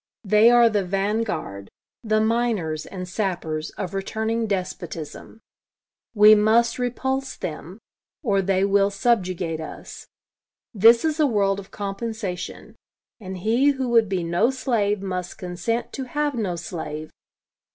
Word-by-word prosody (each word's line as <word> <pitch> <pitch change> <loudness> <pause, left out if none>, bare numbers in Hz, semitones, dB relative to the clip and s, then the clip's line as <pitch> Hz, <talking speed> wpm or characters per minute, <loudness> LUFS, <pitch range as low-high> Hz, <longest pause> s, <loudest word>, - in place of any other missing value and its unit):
They 215 +2 +5
are 240 -1 +6
the 210 -3 +1
van 195 +4 0
guard 100 - -5 0.3
the 215 -1 +2
miners 220 -9 0
and 180 -2 -7
sappers 175 -5 -3
of 185 -2 -4
returning 220 +3 -2
despotism. 180 0 -5 0.7
We 210 +1 +8
must 220 +4 +3
repulse 265 +2 -2
them, 170 +3 -7 0.5
or 200 -6 +2
they 190 0 +1
will 200 0 +3
subjugate 185 -6 0
us. 155 - -9 0.7
This 230 +5 +6
is 315 0 0
a 300 - +4
world 200 -4 +1
of 195 - -11
compensation; 200 -2 -5 0.4
and 190 -3 -7
he 230 +9 +2
who 265 -2 -3
would 230 -3 +4
be 185 -3 -1
no 170 +7 +2
slave 215 -7 0
must 185 -2 -4
consent 180 +6 -3
to 265 - -4
have 295 +3 -1
no 205 -8 -2
slave. 155 -3 -6
205 Hz, 135 wpm, -23 LUFS, 180-230 Hz, 0.7 s, We